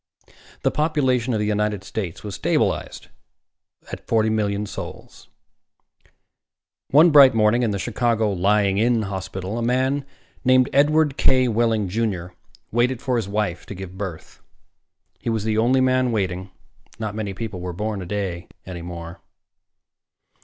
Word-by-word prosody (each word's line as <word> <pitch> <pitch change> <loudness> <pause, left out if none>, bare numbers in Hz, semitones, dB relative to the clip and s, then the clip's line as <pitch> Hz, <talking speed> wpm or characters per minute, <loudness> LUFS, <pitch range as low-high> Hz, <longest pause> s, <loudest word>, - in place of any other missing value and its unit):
The - - +2
population 130 -6 +1
of 110 - 0
the 105 - 0
United 105 -1 -1
States 95 -3 -5
was 105 -2 -6
stabilized - - -1 0.8
at - - -8
forty 110 -1 +2
million 105 -1 0
souls. - - -9 1.6
One 160 +5 +6
bright 140 -4 +8
morning 110 +2 +3
in 120 - +1
the 100 - -1
Chicago 115 0 0
Lying 100 +1 +2
in 115 0 +2
Hospital, 95 +2 -5
a - - -2
man 130 +4 +1 0.4
named 130 0 +4
Edward 150 0 +3
K. 130 -1 +3
Wehling, 115 -2 +1
Jr., 95 -4 -2 0.4
waited 120 +2 +1
for 130 0 -1
his 110 -5 -2
wife 100 -4 -2
to 100 - -7
give 95 0 -8
birth. 95 -5 -7 0.8
He - - -4
was 110 -2 -1
the 110 0 0
only 125 +3 +3
man 130 -1 +2
waiting. 95 -3 -2 0.5
Not 110 -2 -4
many 105 -3 -4
people 110 -3 -5
were 90 0 -4
born 105 +3 -3
a 90 - -7
day 95 -3 -3 0.2
any 90 -2 -7
more. 85 0 -8
110 Hz, 145 wpm, -22 LUFS, 95-125 Hz, 1.6 s, bright